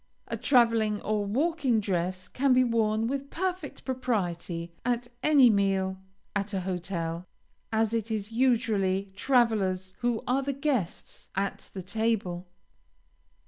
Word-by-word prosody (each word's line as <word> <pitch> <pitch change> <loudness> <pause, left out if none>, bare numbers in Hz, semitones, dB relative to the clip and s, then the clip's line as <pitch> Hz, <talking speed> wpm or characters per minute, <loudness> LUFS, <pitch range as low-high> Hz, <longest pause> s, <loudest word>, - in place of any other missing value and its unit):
A - - -3
traveling 230 -5 +3
or 210 -1 0
walking 275 0 +1
dress 185 -2 -2
can 270 0 +2
be 255 0 +5
worn 225 -2 +1
with 275 +3 -3
perfect 360 -3 -3
propriety, 175 -10 -2
at 245 0 0
any 285 -3 +6
meal 195 -2 +1 0.4
at 200 0 -1
a 190 - 0
hotel, 175 -2 -3 0.4
as 220 0 +1
it 230 -1 -1
is 215 -1 -3
usually 220 -6 +1
travelers 200 -7 +1
who 240 -2 0
are 260 +2 +2
the 280 +1 -2
guests 270 - -3
at 195 +1 -2
the 190 - -5
table. 195 -4 -1
220 Hz, 130 wpm, -28 LUFS, 190-250 Hz, 0.4 s, any